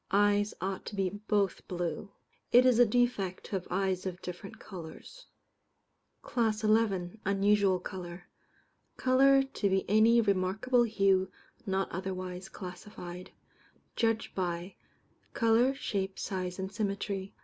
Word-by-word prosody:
Eyes 205 +1 +2
ought 190 0 -3
to 210 - -6
be 190 -2 0
both 205 -1 -1
blue. 175 +1 -3 0.4
It 245 +1 +7
is 250 -2 +4
a 245 - +7
defect 215 -5 0
to - - -12
have 190 -3 -3
eyes 190 0 -1
of 180 -1 -5
different 180 +2 -7
colours. 185 - -10 1.0
CLASS 220 -3 0
XI. 215 -3 +1
Unusual 200 -1 +3
Colour. 180 -1 -7 0.7
Colour 270 +1 +5
to 270 -6 -2
be 190 0 0
any 220 +3 +5
remarkable 210 +4 +2
hue 195 -4 +2 0.4
not 190 0 0
otherwise 185 0 -5
classified. 180 -1 -9 0.7
Judged 225 -1 0
by: 175 0 -3 0.6
Colour, 235 +4 +3
shape, 195 -7 -3
size, 185 -2 -3
and 190 0 -4
symmetry. 200 -1 -3
195 Hz, 125 wpm, -30 LUFS, 185-220 Hz, 1.0 s, It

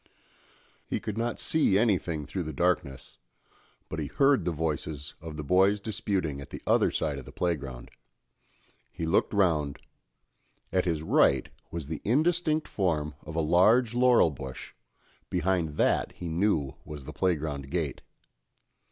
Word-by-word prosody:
He - - -1
could 105 - -5
not 115 +1 -2
see 150 -12 +4
anything 90 -8 +1
through 95 - -4
the 80 -2 -5
darkness, 80 -7 -1 0.7
but 80 - -5
he 75 - -2
heard 135 - +3
the 90 - +1
voices 75 -2 -3
of 80 -1 -7
the 75 - -4
boys 95 +6 +3
disputing 95 -8 -2
at 70 - -10
the - - -8
other - - +3
side 75 -3 -2
of 65 - -11
the - - -11
playground; 70 -9 -3 1.0
he 80 - -4
looked 80 - +2
round; 80 -8 +1 0.9
at 95 0 +1
his 80 -3 -1
right - - +3 0.2
was 85 -4 -5
the 75 +1 -5
indistinct 155 - +1
form 80 -6 -1
of 80 +1 -9
a 80 - +2
large 105 +9 +4
laurel 125 -8 +5
bush, 65 -2 -8 0.6
behind 90 -4 0
that - - +2
he 85 - -6
knew 80 -5 0
was 75 -3 -9
the - - -7
playground 75 -6 -1
gate. - - -2
85 Hz, 150 wpm, -28 LUFS, 75-100 Hz, 1.0 s, laurel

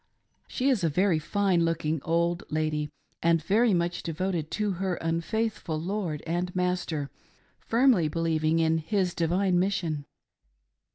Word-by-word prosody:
She 260 - -1
is 240 -9 +1
a 165 - +3
very 180 +1 +2
fine 190 +1 +1
looking 160 -2 0
old 170 +2 0
lady 155 -1 -1 0.3
and 165 0 +3
very 210 +8 +3
much 175 -1 0
devoted 170 -1 -2
to 210 -1 -1
her 190 -2 0
unfaithful 165 +1 -2
lord 175 -3 -3
and 175 +2 -2
master, 180 -6 -1 0.5
firmly 230 - +3
believing 160 0 +1
in 160 0 +2
his 180 +2 0
divine 180 +2 +1
mission. 170 -6 -1
170 Hz, 130 wpm, -27 LUFS, 160-190 Hz, 0.5 s, a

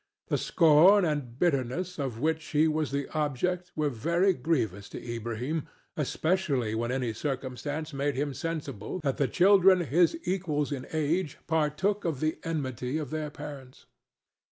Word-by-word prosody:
The - - +2
scorn 175 +4 +6
and 145 -7 -2
bitterness 170 +3 0
of 130 -5 -3
which 160 +3 0
he 155 +1 +2
was 155 -1 0
the 140 0 -2
object 170 +5 -1
were 150 -2 0
very 170 - +2
grievous 120 - -1
to - - -7
Ilbrahim, 120 +6 -4 0.3
especially 150 - 0
when 115 +2 -1
any 125 -3 -1
circumstance 140 +4 -4
made 140 +1 -1
him 140 +1 -1
sensible 150 - -4
that 135 -3 0
the 140 - +2
children 190 +1 +5
his 170 - +3
equals 155 -6 -1
in 135 -2 -4
age 155 +1 0
partook 160 +6 0
of 160 -6 -2
the 155 +1 -1
enmity 135 -4 -2
of 150 -5 -4
their 155 -1 -2
parents. 140 -3 -10
150 Hz, 150 wpm, -28 LUFS, 130-165 Hz, 0.3 s, scorn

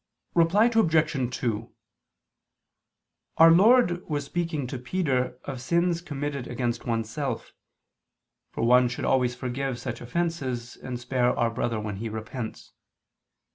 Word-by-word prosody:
Reply 175 +6 +4
Obj. 160 - +2
2: 115 -2 -2 1.7
Our 165 0 +8
Lord 185 -1 +5
was 145 -2 -1
speaking 165 -5 -2
to 125 0 -5
Peter 125 -3 -1
of 135 -3 -6
sins 170 +4 +1
committed 145 -5 -4
against 120 -1 -2
oneself, 115 +3 -3 1.0
for - - -3
one 125 +1 +5
should 125 - -4
always 125 -2 +2
forgive 130 +1 -3
such 120 0 -6
offenses 130 -4 -3
and 125 -2 -6
spare 125 0 +1
our 115 -1 +2
brother 115 -1 -1
when 105 -2 -4
he 115 +2 -4
repents. 110 +2 -6
130 Hz, 125 wpm, -26 LUFS, 120-165 Hz, 1.7 s, Our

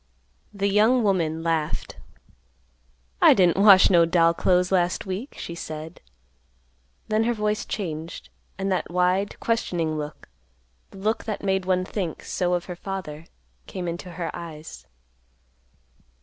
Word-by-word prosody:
The 200 -1 -1
young 220 +5 +4
woman 165 -5 0
laughed. 160 -2 -2 1.2
"I - - +8
didn't 185 0 +3
wash 195 -3 +8
no 170 -2 +6
doll 165 0 +3
clothes 180 +1 +2
last 180 -1 +1
week," 195 +8 -5
she 170 - -6
said. 160 0 -7 1.1
Then 215 +1 +1
her 240 0 +1
voice 210 0 -1
changed, 165 -4 -5 0.3
and 195 0 -2
that 185 - -1
wide, 180 +3 0
questioning 170 -9 -1
look, 150 +1 -7 0.6
the - - -14
look 215 +3 -1
that 215 -2 -4
made 190 -1 0
one 185 -1 +1
think 185 -5 -4
so 180 -1 0
of 175 - -3
her 180 - -6
father, 170 -5 -6 0.4
came 180 -2 -5
into 175 +1 -5
her 170 -1 -4
eyes. 155 - -9
180 Hz, 135 wpm, -24 LUFS, 165-195 Hz, 1.2 s, I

